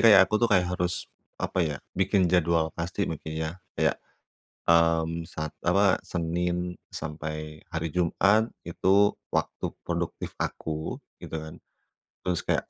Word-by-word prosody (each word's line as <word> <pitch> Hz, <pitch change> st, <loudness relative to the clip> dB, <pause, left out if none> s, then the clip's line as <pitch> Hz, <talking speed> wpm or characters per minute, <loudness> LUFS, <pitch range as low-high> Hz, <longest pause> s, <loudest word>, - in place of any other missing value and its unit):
kayak 105 Hz, -4 st, +9 dB
aku 100 Hz, -, -3 dB
tuh 120 Hz, -, +4 dB
kayak 90 Hz, -4 st, +4 dB
harus, 90 Hz, -1 st, -1 dB, 0.3 s
apa -, -, -2 dB
ya, 75 Hz, -4 st, +1 dB, 0.2 s
bikin 95 Hz, 0 st, +3 dB
jadwal 85 Hz, -2 st, +3 dB
pasti 90 Hz, +4 st, -2 dB
mungkin 80 Hz, -2 st, -5 dB
ya? 80 Hz, 0 st, -1 dB, 0.3 s
Kayak, -, -, +2 dB, 0.7 s
mmm, 85 Hz, 0 st, +4 dB
sat 75 Hz, -1 st, -4 dB, 0.2 s
apa, 95 Hz, +2 st, +5 dB
Senin 90 Hz, +1 st, -1 dB, 0.2 s
sampai 75 Hz, 0 st, -5 dB
hari 80 Hz, +1 st, -1 dB
Jumat 95 Hz, +6 st, +3 dB
itu 95 Hz, +4 st, +3 dB, 0.2 s
waktu -, -, -1 dB, 0.2 s
produktif -, -, -3 dB
aku 80 Hz, 0 st, -3 dB, 0.2 s
gitu -, -, -7 dB
kan, 80 Hz, 0 st, -9 dB, 0.6 s
terus 90 Hz, -2 st, 0 dB
kayak -, -, 0 dB
85 Hz, 130 wpm, -28 LUFS, 80-90 Hz, 0.7 s, kayak